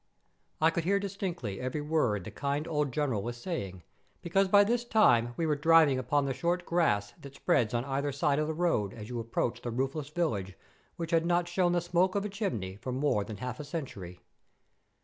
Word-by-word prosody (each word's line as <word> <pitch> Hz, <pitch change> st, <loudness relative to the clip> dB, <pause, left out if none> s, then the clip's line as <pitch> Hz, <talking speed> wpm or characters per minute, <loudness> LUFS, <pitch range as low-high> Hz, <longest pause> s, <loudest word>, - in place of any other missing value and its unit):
I 160 Hz, +1 st, +4 dB
could 170 Hz, 0 st, -2 dB
hear 200 Hz, +4 st, +2 dB
distinctly 180 Hz, -, -4 dB
every 130 Hz, +4 st, -2 dB
word 145 Hz, -, 0 dB
the -, -, -8 dB
kind 145 Hz, +3 st, -2 dB
old 150 Hz, -3 st, 0 dB
General 130 Hz, -6 st, 0 dB
was 120 Hz, +3 st, -5 dB
saying, 100 Hz, -, -5 dB, 0.4 s
because 195 Hz, +3 st, +2 dB
by 205 Hz, +2 st, +6 dB
this 235 Hz, +3 st, 0 dB
time 120 Hz, -, +3 dB
we 165 Hz, -, 0 dB
were 155 Hz, -2 st, +2 dB
driving 155 Hz, -3 st, +5 dB
upon 140 Hz, +2 st, +1 dB
the 135 Hz, -, -1 dB
short 175 Hz, +6 st, -1 dB
grass 105 Hz, -13 st, +1 dB
that 140 Hz, 0 st, -11 dB
spreads 120 Hz, -5 st, +1 dB
on 120 Hz, +2 st, -1 dB
either 140 Hz, +1 st, -1 dB
side 140 Hz, +1 st, +1 dB
of 155 Hz, -, 0 dB
the 160 Hz, -, -1 dB
road 155 Hz, -, 0 dB
as 110 Hz, -1 st, -9 dB
you 120 Hz, -1 st, -3 dB
approach 115 Hz, +1 st, -2 dB
the 120 Hz, -, -4 dB
roofless 135 Hz, +4 st, -2 dB
village 110 Hz, -, -2 dB, 0.4 s
which 165 Hz, -1 st, -5 dB
had 165 Hz, 0 st, +2 dB
not 175 Hz, 0 st, +2 dB
shown 175 Hz, 0 st, +1 dB
the 175 Hz, -, +2 dB
smoke 175 Hz, +2 st, +1 dB
of 200 Hz, 0 st, 0 dB
a -, -, -2 dB
chimney 115 Hz, -, -3 dB
for 130 Hz, -, -5 dB
more 130 Hz, -5 st, +1 dB
than 105 Hz, 0 st, -7 dB
half 125 Hz, +2 st, -5 dB
a -, -, -4 dB
century. 125 Hz, -, -7 dB
145 Hz, 210 wpm, -30 LUFS, 120-170 Hz, 0.4 s, by